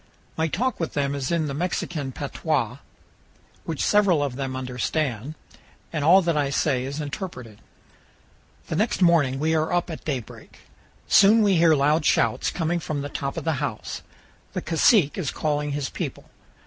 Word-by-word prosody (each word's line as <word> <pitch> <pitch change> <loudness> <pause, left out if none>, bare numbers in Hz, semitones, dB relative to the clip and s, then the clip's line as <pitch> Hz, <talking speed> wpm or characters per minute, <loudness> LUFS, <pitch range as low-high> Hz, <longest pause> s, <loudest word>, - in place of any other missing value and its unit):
My 160 0 0
talk 235 - -1
with 165 - -3
them 140 -1 0
is 140 -2 -3
in 165 -2 +1
the 140 - -3
Mexican 150 -3 -3
patois, 135 -3 -2 0.9
which 160 -3 -2
several 195 -8 +3
of 135 -3 -3
them 135 -1 -4
understand, 130 +1 -2 0.6
and 150 -3 -1
all 180 +5 +6
that 170 -1 +1
I 145 -2 +1
say 135 -2 0
is 140 +3 -5
interpreted. 140 - -6 1.1
The - - -4
next 210 +1 +1
morning 155 -7 +4
we 160 +2 +1
are 160 +1 +1
up 175 0 0
at 160 - -7
daybreak. 130 -8 -6 0.5
Soon 215 +3 +6
we 195 -3 +3
hear 165 -1 +5
loud 150 +3 +2
shouts - - +2
coming 170 0 -1
from 150 -3 -4
the 145 - -5
top 140 +1 -4
of 165 - -3
the 160 -3 -1
house. - - -4 0.5
The - - -2
cacique 165 - +3
is 155 -8 -1
calling 150 -1 -1
his 145 -2 -3
people. - - -6
150 Hz, 170 wpm, -24 LUFS, 140-170 Hz, 1.1 s, all